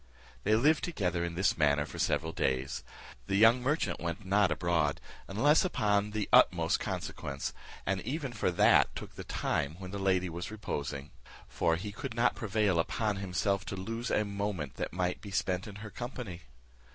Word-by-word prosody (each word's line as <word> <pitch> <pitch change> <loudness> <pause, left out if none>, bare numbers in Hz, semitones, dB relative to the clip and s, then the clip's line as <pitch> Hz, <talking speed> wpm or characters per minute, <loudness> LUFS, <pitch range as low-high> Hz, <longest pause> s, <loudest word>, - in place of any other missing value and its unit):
They 105 +2 +4
lived 150 +7 +3
together 90 - -1
in 85 -1 -3
this 95 +3 +2
manner 75 -2 +3
for - - -9
several 80 0 +1
days. 65 -3 -1 0.4
The 95 - 0
young 115 +4 +6
merchant 145 +6 0
went 85 +4 -4
not 100 -1 +3
abroad, 80 -2 +1 0.3
unless 145 +11 +4
upon 105 - +1
of 105 - -10
the 105 -2 -1
utmost - - +5
consequence, 70 0 -4 0.3
and 95 -1 0
even 135 - -3
for 105 - 0
that 85 - +4
took - - -7
the - - -7
time 70 +3 -1
when 90 -1 -8
the 100 - -4
lady 95 -1 +2
was 85 +1 -5
reposing; 75 -9 -4 0.4
for 80 - +1
he 100 +5 -5
could 120 +3 -6
not 120 +1 +3
prevail 105 -5 +1
upon 105 +4 0
himself 100 +1 0
to 100 - -4
lose 115 +6 -4
a 110 - +2
moment 100 -8 -3
that - - -3
might 90 +1 -1
be 100 - -8
spent 95 -1 -1
in 100 - -9
her 110 - -8
company. 120 -8 -6
100 Hz, 180 wpm, -31 LUFS, 85-110 Hz, 0.4 s, young